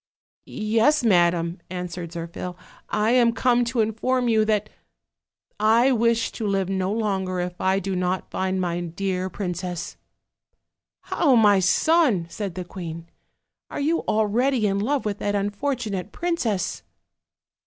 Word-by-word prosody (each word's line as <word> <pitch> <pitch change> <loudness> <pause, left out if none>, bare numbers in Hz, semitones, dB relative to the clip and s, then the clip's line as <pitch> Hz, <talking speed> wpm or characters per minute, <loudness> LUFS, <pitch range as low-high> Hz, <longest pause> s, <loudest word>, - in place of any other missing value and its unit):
"Yes, 225 +7 +2
madam," 175 -4 +2
answered 180 -1 -5
Zirphil, 170 +1 -6 0.3
"I 215 +2 +1
am 240 -2 +4
come 245 0 +2
to 235 0 0
in 220 0 0
form 250 +3 0
you 220 -2 +3
that 215 -1 +1 0.9
I 230 +5 +4
wish 230 -1 +2
to 220 - -4
live 195 -2 0
no 190 0 -1
longer 195 -4 -1
if 180 0 -4
I 190 +1 +2
do 195 0 -2
not 180 +1 -2
find 190 0 -1
my 175 -1 -1
dear 185 +2 -2
princess." 180 -2 -4 1.0
"How, 285 -7 +2
my 205 -4 +5
son!" 245 - +3
said 200 -5 -5
the 180 -1 -5
queen, 170 -2 -8 0.6
"are - - -5
you 315 +4 +1
already 220 +3 +2
in 200 -1 +1
love 265 +5 0
with 205 -1 -2
that 205 0 -1
unfortunate 205 -1 -2
princess?" 310 - -1
205 Hz, 140 wpm, -24 LUFS, 180-230 Hz, 1.0 s, my